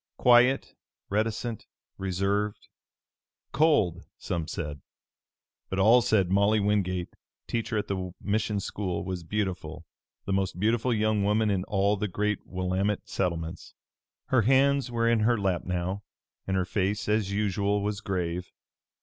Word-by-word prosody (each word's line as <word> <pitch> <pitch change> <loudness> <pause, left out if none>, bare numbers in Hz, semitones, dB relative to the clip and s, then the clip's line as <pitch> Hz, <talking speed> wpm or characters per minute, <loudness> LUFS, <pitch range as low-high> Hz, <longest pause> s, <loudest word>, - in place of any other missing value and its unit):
Quiet, 125 +2 +4 0.4
reticent, 110 +2 -2 0.3
reserved 100 +2 -1 0.8
cold, 125 - +2
some 85 -3 -3
said; 75 -4 -5 0.9
but 95 - -3
all 110 +6 +6
said 95 -6 +2
Molly 100 +2 +4
Wingate, 95 -3 0 0.3
teacher 115 -1 -2
at 105 - -2
the 95 -2 -3
mission 105 0 -1
school, 95 -2 -3
was 90 -2 -3
beautiful, 95 0 -3 0.4
the 100 - -1
most 95 -2 -1
beautiful 115 +4 +1
young 110 -2 +1
woman 105 +1 +2
in 95 -2 0
all 100 0 +1
the 105 - -1
great 105 +2 -1
Willamette 95 +2 -1
settlements. 85 -3 -3 0.5
Her 130 -3 +4
hands 135 +3 +3
were 115 -1 0
in 115 -1 +3
her 115 +2 +3
lap 95 -4 -1
now, 90 +2 -2 0.5
and 95 0 0
her 95 - +1
face 100 +2 -1
as 105 -2 +1
usual 100 0 0
was 105 0 -2
grave. 90 -3 -3
100 Hz, 135 wpm, -28 LUFS, 95-110 Hz, 0.9 s, all